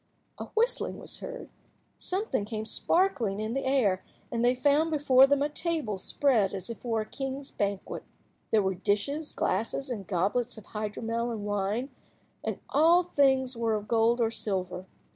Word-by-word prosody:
A - - -4
whistling 470 +3 +1
was - - -2
heard, - - -7 0.5
something 370 - -1
came 215 +1 -4
sparkling 245 - +1
in 215 +1 -2
the 270 +1 -2
air, 220 -9 +2 0.3
and 235 0 0
they 245 +1 +4
found 290 +5 +3
before 275 -4 +5
them 285 0 +2
a - - +2
table 300 - -2
spread 215 -4 +2
as 190 +3 -5
if 230 - -8
for 225 -2 -1
a - - -4
king's 270 +3 -5
banquet. 200 -1 -2 0.5
There 215 -2 +3
were 190 0 +1
dishes, 210 - -1
glasses, 260 +4 -1
and 200 -6 -5
goblets 205 +7 0
of 215 - -11
hydromel 225 +2 -3
and 220 -3 -4
wine, 205 +6 -1 0.5
and - - -2
all 335 +4 +5
the 355 - -21
things 265 -2 +3
were 230 -1 0
of 210 0 -4
gold 230 +1 +3
or 225 -1 +2
silver. 185 -4 -2
235 Hz, 170 wpm, -29 LUFS, 210-280 Hz, 0.5 s, before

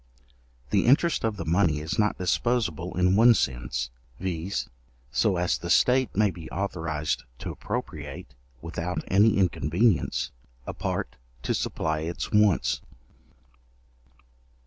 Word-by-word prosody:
The 105 +2 +2
interest 155 +6 +4
of 110 -2 -1
the 85 - -4
money 80 -2 +2
is 80 +6 -3
not 105 -1 +2
disposable 90 -4 0
in 90 +1 +3
one 115 +2 +7
sense, 60 -4 -2 0.3
viz. 90 +1 -3 0.4
so 95 +2 +2
as 90 0 0
the 85 - -6
state 125 +7 +3
may 105 0 +3
be 85 -3 -10
authorized 80 -7 -2
to - - -5
appropriate, 75 -3 -6 0.3
without 85 +2 -3
any 105 +4 +4
inconvenience, 90 +2 +1 0.3
a - - -5
part - - -3 0.3
to - - 0
supply 80 -1 -1
its 85 +2 -4
wants. 105 -3 +3
90 Hz, 125 wpm, -26 LUFS, 80-105 Hz, 0.4 s, one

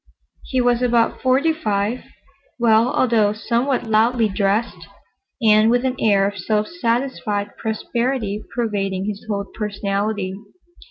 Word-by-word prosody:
He 260 - -1
was 245 0 +2
about 240 -2 +1
forty 270 +5 +3
five, 215 -4 -2 0.5
well, 230 -1 +4
although 220 -4 +2
somewhat 240 +4 -1
loudly 225 +1 +2
dressed, 200 +4 -1 0.6
and 215 0 +5
with 245 +2 +2
an 260 0 0
air 200 -2 +3
of 205 -1 -5
self 210 +3 0
satisfied 235 -8 -2
prosperity 220 -1 -2
pervading 195 -5 -1
his 210 -1 -5
whole 200 -1 -2
personality. 205 -1 -2
220 Hz, 120 wpm, -20 LUFS, 205-245 Hz, 0.6 s, and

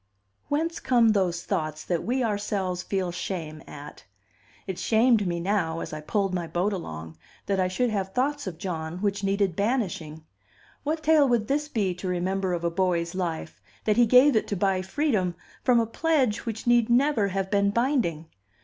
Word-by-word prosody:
Whence 320 +3 -1
come 240 -3 +4
those 185 -5 +1
thoughts 155 -5 -2
that 175 -2 -1
we 255 +2 0
ourselves 200 -4 -1
feel 185 -2 -2
shame 165 -4 -5
at? 145 0 -10 0.6
It 190 -2 -5
shamed 225 -2 +3
me 170 -1 -1
now, 170 -3 0
as 160 - -6
I 155 - -5
pulled 195 +4 -1
my 175 -2 -2
boat 175 +6 0
along, 80 - -7 0.3
that 195 -1 0
I 185 - +2
should 235 +6 0
have 195 -2 -2
thoughts 285 +3 -1
of 170 -4 -5
John 165 -3 -4
which 200 -1 0
needed 195 -2 +1
banishing. 175 -9 -2 0.6
What 310 +2 -2
tale 305 -3 +5
would 230 -3 +1
this 295 +2 0
be 205 -10 0
to 180 +2 -6
remember 185 +1 -1
of 170 -1 -3
a 170 - 0
boy's 170 -1 0
life, 175 -4 -4 0.2
that 215 0 +1
he 240 -1 +5
gave 255 +3 +6
it 215 - +1
to 205 - -2
buy 190 0 +1
freedom 190 - 0 0.3
from 245 -2 +4
a 230 - +2
pledge 255 -3 0
which 220 -1 -4
need 240 -1 +4
never 245 -3 +3
have 195 0 -2
been 200 0 +3
binding? 230 - 0
195 Hz, 185 wpm, -26 LUFS, 175-235 Hz, 0.6 s, gave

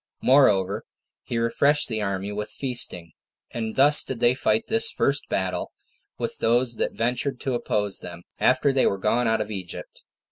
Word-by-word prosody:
Moreover, 100 -8 +3 0.4
he 120 - -5
refreshed 140 +6 +2
the 110 -3 -3
army 100 0 -3
with 105 +1 -4
feasting. 120 -10 -2 0.4
And 110 -2 -4
thus 145 +2 +6
did 130 -3 -6
they 120 +1 +4
fight 220 - 0
this 225 0 +3
first 140 +1 -1
battle 95 -1 -2 0.4
with - - -1
those 120 0 +2
that - - -1
ventured 125 +3 -2
to 135 - -2
oppose 105 -4 -1
them, 85 0 -10 0.2
after 140 - +3
they 135 - +3
were 100 - 0
gone 115 +5 0
out 110 -1 +1
of 105 0 -5
Egypt. 95 -4 -7
115 Hz, 170 wpm, -24 LUFS, 100-135 Hz, 0.4 s, thus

